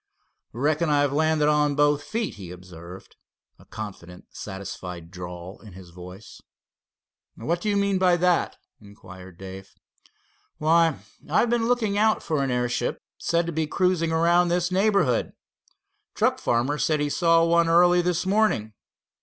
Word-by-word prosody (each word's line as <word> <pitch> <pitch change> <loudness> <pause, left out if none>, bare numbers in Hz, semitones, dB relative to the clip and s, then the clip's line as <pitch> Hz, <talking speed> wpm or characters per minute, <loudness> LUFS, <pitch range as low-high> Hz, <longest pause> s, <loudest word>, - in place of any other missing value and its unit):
"Reckon 155 +5 0
I've 145 -1 +2
landed 155 0 +2
on 150 -1 +2
both 145 0 +2
feet," 220 +9 -3
he 95 -5 -10
observed, 90 +1 -12 0.4
a - - -18
confident, 90 -4 -9
satisfied 90 -4 -8
drawl 90 0 -9
in 105 -4 -13
his 90 -2 -13
voice. 90 +3 -12 0.9
"What 170 +9 -2
do 215 - -1
you 205 - +1
mean 200 -1 +1
by 180 -2 +3
that?" 180 0 +1 0.2
inquired 95 -3 -14
Dave. 95 0 -10 0.8
"Why, 165 0 +3 0.3
I've 225 +9 +2
been 235 -1 +1
looking 220 -5 0
out 220 0 +2
for 155 -3 -1
an 135 - -1
airship 125 -1 -1 0.2
said 170 0 0
to 170 - -3
be 160 -1 -2
cruising 180 -1 0
around 170 +2 +3
this 175 +1 0
neighborhood. 190 - +1 0.8
Truck - - +1
farmer 125 +5 0
said 155 -1 +1
he 145 - 0
saw 165 0 +3
one 170 0 +3
early 175 +1 +5
this 175 0 -1
morning. 190 - +1
150 Hz, 145 wpm, -24 LUFS, -, 0.9 s, early